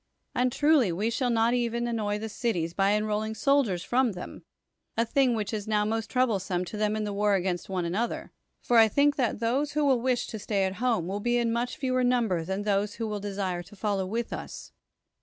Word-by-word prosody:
And 250 0 +1
truly 290 - +3
we 205 +7 -1
shall 250 +1 0
not 230 0 +2
even 235 -1 0
annoy 215 -3 -1
the 220 +1 -5
cities 185 -7 -2
by 195 +2 +2
enrolling 215 +1 -1
soldiers 225 -7 +2
from 250 -2 +1
them, 180 - -8 0.6
a 230 - +3
thing 255 0 +2
which 215 -1 -3
is 210 -1 -3
now 210 -1 +2
most 225 +1 -2
troublesome 195 -8 0
to 195 - -7
them 210 0 +1
in 215 - -2
the 205 -1 -3
war 205 0 +2
against 180 -1 -2
one 185 -2 -1
another; 205 +8 -2 0.3
for 240 - +2
I 225 - +7
think 285 +6 +3
that 250 -5 0
those 265 +6 0
who 300 0 +1
will 260 -4 +3
wish 250 -1 +1
to 220 - -5
stay 200 -1 0
at 190 +1 -2
home 235 -9 +1
will 195 +3 -3
be 240 +2 +1
much 235 +2 -1
fewer 255 -2 0
in 245 - +3
number 225 -9 +1
than 190 +4 -3
those 205 0 0
who 225 - -3
will 210 -1 -3
desire 195 -3 -3
to 175 +4 -14
follow 200 -2 -1
with 230 +4 -3
us. - - -7
220 Hz, 220 wpm, -27 LUFS, 200-240 Hz, 0.6 s, I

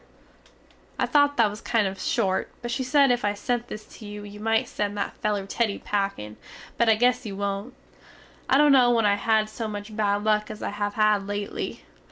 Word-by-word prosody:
"_ - - -30 0.4
I - - +1
thot 285 -1 +3
that 230 -2 +5
was 210 +2 -9
kind 225 -3 +1
of 190 0 -4
short 190 -5 0
but 240 - -3
she 260 +2 -1
sed 275 +1 +4
if 245 0 0
I 205 0 0
sent 240 +3 -2
this 215 -2 -8
to 220 - -10
you 205 0 -7
you 205 0 -10
mite 225 +1 +1
send 205 0 -3
that 200 - -3
feler 205 -2 -1
Teddy 210 +1 -1
packin, 195 - -3 0.4
but 235 -1 +2
I 220 - +6
guess 250 +2 +2
you 205 -4 -6
wont. 200 +5 -3 0.7
I 265 - +5
dont 295 0 +6
no 255 -3 +6
when 230 -2 +3
I 205 - +4
have 200 - 0
had 220 0 +2
so 220 +1 -5
much 210 0 -7
bad 205 -1 +1
luck 215 0 +1
as 215 -1 -7
I - - -2
have 205 0 -3
had 210 -2 +2
lately. 205 0 -4
215 Hz, 225 wpm, -25 LUFS, 205-235 Hz, 0.7 s, I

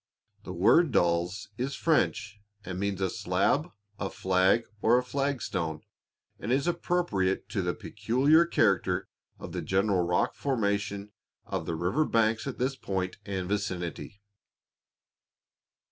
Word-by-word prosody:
The - - -6
word 130 - +4
"Dalles" 85 +1 +1
is 135 +3 -2
French, 110 -10 0 0.2
and 90 0 -5
means 100 -1 -2
a 95 - +1
slab, 100 - +1 0.3
a 100 - -2
flag 95 +5 +2 0.2
or 120 +2 +5
a 125 - +1
flagstone, 120 - -2 0.6
and 110 - -3
is 135 +3 +2
appropriate 170 - 0
to 100 -2 -1
the 90 -1 -1
peculiar 135 +11 +2
character 95 - +1 0.3
of - - -8
the - - -3
general 95 0 +1
rock 90 0 +1
formation 100 -5 -1 0.3
of - - -4
the 85 - -1
river 90 - +1
banks 115 0 +1
at 135 - -4
this 130 +2 0
point 95 -6 -3
and 95 -2 -3
vicinity. 100 0 -4
100 Hz, 130 wpm, -28 LUFS, 95-125 Hz, 0.6 s, or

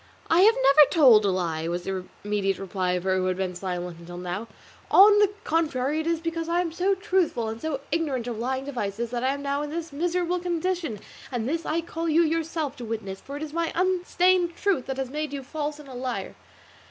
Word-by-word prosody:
"I 330 - +5
have 440 +4 +6
never 305 - +6
told 245 -10 +6
a - - +3
lie," 165 -4 -1
was 175 +1 -2
the 190 -1 -4 0.2
immediate 200 -2 0
reply 185 -1 -2
of 180 -1 -2
her 190 0 +1
who 185 0 0
had 185 0 -1
been 190 -1 -2
silent 180 -2 -5
until 175 +1 -9
now; 180 +5 -4 0.4
"on 410 +1 +8
the 415 -2 +5
contrary, 300 -3 0
it 315 - -3
is 335 -1 +1
because 330 0 -3
I 345 +1 +2
am 340 -2 -3
so 370 +4 +1
truthful 365 - 0
and 225 +1 -6
so 310 -4 -3
ignorant 290 -7 -1
of 235 -3 -4
lying 260 +3 -2
devices 235 -4 -3
that 245 0 -2
I 260 - +2
am 280 - -7
now 280 0 -1
in 295 - -4
this 330 -1 -5
miserable 350 +3 0
condition; 345 - -2 0.3
and 240 -2 -2
this 330 +4 -2
I 330 +2 0
call 330 0 -4
you 325 +2 +4
yourself 320 -2 -1
to 245 - -7
witness, 215 -4 -5
for 280 +1 -7
it 300 - -5
is 305 -1 -7
my 335 0 -1
unstained 360 -1 +2
truth 375 -10 0
that 265 -1 -3
has 265 -1 -3
made 300 0 -3
you 275 -1 -4
false 295 +2 -4
and 300 -2 -13
a 265 - -10
liar." 250 0 -4
285 Hz, 225 wpm, -26 LUFS, 215-335 Hz, 0.4 s, on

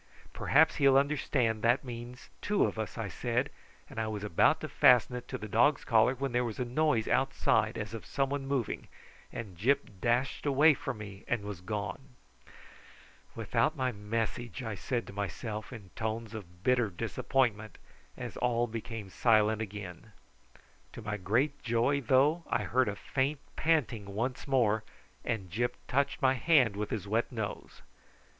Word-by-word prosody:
"Perhaps 160 +3 +3
he 140 - +4
will 135 0 +6
understand 135 -5 +1
that 120 +3 +3
means 120 0 -8
two 205 0 +2
of - - -3
us," 110 - -4
I 115 -3 -2
said; 120 - -1 0.4
and - - -7
I 110 - -1
was 105 -1 -4
about 105 -6 +3
to - - -3
fasten 125 0 +5
it 125 - -6
to - - -4
the 110 - -7
dog's 120 +7 +3
collar, 115 +2 +4
when 135 +1 -2
there 120 +1 +1
was 115 -3 -4
a 125 - -1
noise 125 -2 +1
outside 130 -4 +2
as 105 0 -5
of 115 - -6
some 135 -1 0
one 140 -1 -2
moving, 135 -5 -2 0.4
and 105 -6 -7
Gyp 115 0 0
dashed 125 +5 0
away 145 +3 +6
from 135 -4 -5
me 100 -2 -9
and 120 -4 -1
was 100 -4 -6
gone. 105 +7 -5 1.2
"Without 155 +1 +1
my 130 -1 0
message," 115 +2 -3
I 110 -3 -3
said 120 +4 -2
to - - -10
myself 105 +3 -4
in 105 -7 -10
tones 110 0 -3
of 90 -4 -10
bitter 120 -3 +3
disappointment, 110 +3 -1 0.4
as - - -6
all 120 -1 +1
became 115 -3 -6
silent 110 -1 +3
again. 105 -1 -7 0.8
To 115 - -9
my 105 -1 -3
great 120 +10 0
joy, 120 +4 +1
though, 140 +7 +3
I - - +1
heard 130 +2 +2
a 100 - -3
faint 135 +7 -1 0.2
panting 120 -11 0
once 125 +6 -2
more, 110 -6 +2 0.4
and 95 -6 -3
Gyp 120 +6 0
touched 140 +1 0
my 130 0 +5
hand 130 -5 +3
with 105 +1 -3
his 105 -3 -4
wet 115 +5 0
nose. 110 -4 -6
115 Hz, 170 wpm, -31 LUFS, 105-130 Hz, 1.2 s, will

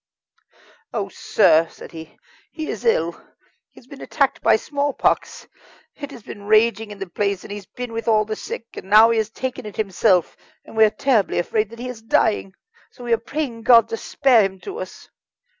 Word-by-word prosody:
"Oh, - - -2
sir!" 160 +1 +3
said - - -13
he, 160 -1 -11 0.3
"he 315 -2 -5
is - - -7
ill, 465 +2 +2 0.6
he - - -17
has - - -21
been 275 +2 -12
attacked 275 -3 0
by - - +5
smallpox. 285 +4 -1 0.5
It 285 -2 -8
has 250 -6 -12
been 205 0 -10
raging 220 0 +3
in 205 - -9
the 195 - -5
place, 200 +1 -2
and - - -10
he 205 - -4
has 200 -2 -11
been 245 -2 -7
with 230 0 -5
all 215 -1 +3
the 215 0 -4
sick, 230 - -7
and 190 - -10
now 220 +2 +7
he 230 - +2
has 220 -1 -1
taken 255 -1 -5
it 210 - -9
himself, 195 -3 +1 0.3
and - - -13
we 220 0 +6
are - - +3
terribly 230 -3 +1
afraid 210 +4 0
that 230 - -12
he 245 +2 -6
is 250 -3 -8
dying. 215 -3 +1 0.3
So 250 - -14
we 240 -1 0
are 230 - +2
praying 245 -1 -4
God 230 -1 +6
to 225 - -3
spare 260 -3 +3
him 195 -1 -2
to 400 +4 -7
us." - - -9
225 Hz, 210 wpm, -21 LUFS, 205-250 Hz, 0.6 s, now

